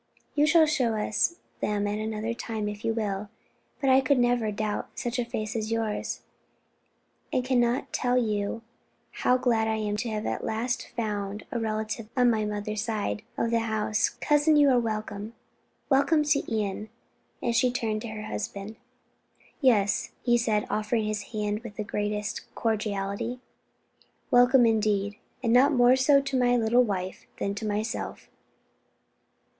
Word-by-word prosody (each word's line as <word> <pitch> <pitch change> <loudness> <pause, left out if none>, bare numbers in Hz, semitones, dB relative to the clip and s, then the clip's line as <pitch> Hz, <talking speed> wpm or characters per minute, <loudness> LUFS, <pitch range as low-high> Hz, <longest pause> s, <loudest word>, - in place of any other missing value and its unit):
"You 300 0 +3
shall 320 0 +6
show 260 -7 +1
us 215 +9 +1 0.2
them 205 -1 0
at 205 +1 -1
another 220 +1 -2
time 220 -2 -4
if 210 0 -6
you 225 - +1
will; 210 -2 -2 0.5
but 270 -2 +2
I 260 +1 +6
could 270 +1 +2
never 245 -3 +2
doubt 210 0 -3
such 240 +1 -2
a 240 - 0
face 215 -2 -4
as 220 0 -2
yours, 225 -2 -2 1.1
and 255 - 0
can 255 -1 +2
not 240 +2 0
tell 250 0 +1
you 215 -1 -1 0.5
how 250 - +2
glad 230 -3 +2
I 220 - +1
am 210 -1 -2
to 230 - -2
have 215 0 -3
at - - -2
last 240 +3 -2
found 210 -3 -3
a 240 - -1
relative 220 0 -3
on 245 -1 +5
my 215 -2 0
mother's 210 0 -3
side 220 -2 -2 0.2
of 230 - 0
the 230 - +3
house. 220 -1 0
Cousin, 295 +1 +2
you 290 -2 +6
are 250 - +4
welcome, 215 -1 -4 0.5
welcome 295 +3 +3
to 290 -1 +2
Ion!" 210 -1 -2 0.5
And 235 - -1
she 250 +1 +3
turned 220 -3 -2
to 235 - -5
her 215 -1 -6
husband. 210 0 -5 0.8
"Yes," 210 -7 +2
he 240 -1 +4
said, 220 -3 +1
offering 215 +1 0
his 210 0 -4
hand 210 -1 -1
with 230 -3 -10
the 215 - -3
greatest 210 0 -2
cordiality, 210 +1 -2 0.9
"welcome 245 +1 +6
indeed, 210 -2 +1 0.3
and 230 -1 +2
not 265 +4 +6
more 245 -2 +5
so 275 +2 +5
to 275 -1 -1
my 245 0 +3
little 235 +1 +4
wife 190 -4 -4
than 200 - -1
to 215 +2 -4
myself." 210 +2 -3
220 Hz, 160 wpm, -27 LUFS, 210-245 Hz, 1.1 s, shall